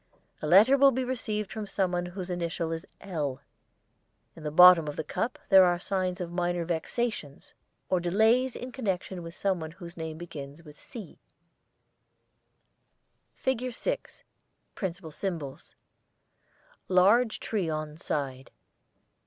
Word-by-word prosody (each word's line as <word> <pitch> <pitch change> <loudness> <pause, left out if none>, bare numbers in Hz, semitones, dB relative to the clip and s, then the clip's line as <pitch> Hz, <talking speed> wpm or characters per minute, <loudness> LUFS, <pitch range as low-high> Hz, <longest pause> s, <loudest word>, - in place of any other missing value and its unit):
A 155 - -2
letter 215 - +7
will 275 0 +8
be 260 0 -1
received 215 -5 -3
from 215 -2 -5
someone 180 -3 0
whose 180 0 -6
initial 170 -1 -2
is 165 0 -5
'L.' 150 -8 -3 1.0
In 165 - -12
the 150 - -3
bottom 175 0 +8
of 145 - -4
the - - -3
cup 225 +10 -2
there 190 -2 +9
are 175 -1 +3
signs 185 0 -2
of 175 -2 -4
minor 175 -1 -1
vexations 170 - -3 0.3
or 185 - +2
delays 220 +8 +3
in 250 +1 -6
connection 190 -7 -3
with 165 +1 -9
someone 185 -6 -1
whose 170 +1 -11
name 160 -1 -5
begins 155 -2 -9
with 150 -2 -14
'C.' 215 -8 -10 2.3
[ILLUSTRATION 255 -1 0
6] - - -10
FIG. - - -1
6 - - -19 0.5
Principal 175 -4 -5
Symbols: 150 -5 -5 1.1
Large 205 +6 +4
tree 200 -7 -2
on 155 -1 -3
side. 135 -4 -4
180 Hz, 135 wpm, -28 LUFS, 160-210 Hz, 2.3 s, there